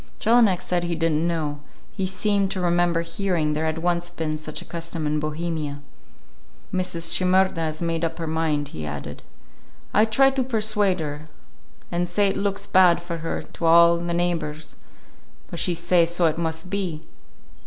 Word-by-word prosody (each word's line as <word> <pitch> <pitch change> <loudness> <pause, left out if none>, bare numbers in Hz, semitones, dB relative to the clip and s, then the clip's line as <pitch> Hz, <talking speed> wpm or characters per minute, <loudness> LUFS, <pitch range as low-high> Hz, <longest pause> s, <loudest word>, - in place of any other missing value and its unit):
Jelinek 225 -5 +4
said 175 -1 -1
he 170 -1 -1
did 165 0 +1
n't 155 +2 +1
know; 155 -4 -2 0.3
he 190 -3 -2
seemed 200 +1 0
to 190 - -3
remember 175 -1 +2
hearing 170 -4 -1
there 155 +1 -1
had 160 0 -1
once 175 +1 0
been 160 -3 -3
such 155 0 -5
a - - -9
custom 165 -1 -5
in 150 0 0
Bohemia. 155 -1 -3 0.9
"Mrs. 175 -3 0
Shimerda 185 -3 +2
is 155 +2 -4
made 165 0 -1
up 165 0 -2
her 165 - -4
mind," 155 -2 -1
he 80 - -7
added. 75 -1 -6 0.7
"I 215 - +5
try 270 +5 +4
to 270 0 -1
persuade 210 -6 0
her, 150 0 -5 0.7
and 175 0 -1
say 200 +3 +2
it 195 - -2
looks 200 0 -1
bad 180 -2 +5
for 170 -1 -5
her 165 +1 -3
to 170 - -6
all 170 +1 +7
the 170 0 -3
neighbors; 165 -3 -2 0.8
but 170 - -4
she 175 - +1
say 170 0 +3
so 170 +1 +1
it 160 0 +1
must 160 +2 -3
be. 185 -6 -2
170 Hz, 175 wpm, -24 LUFS, 160-185 Hz, 0.9 s, all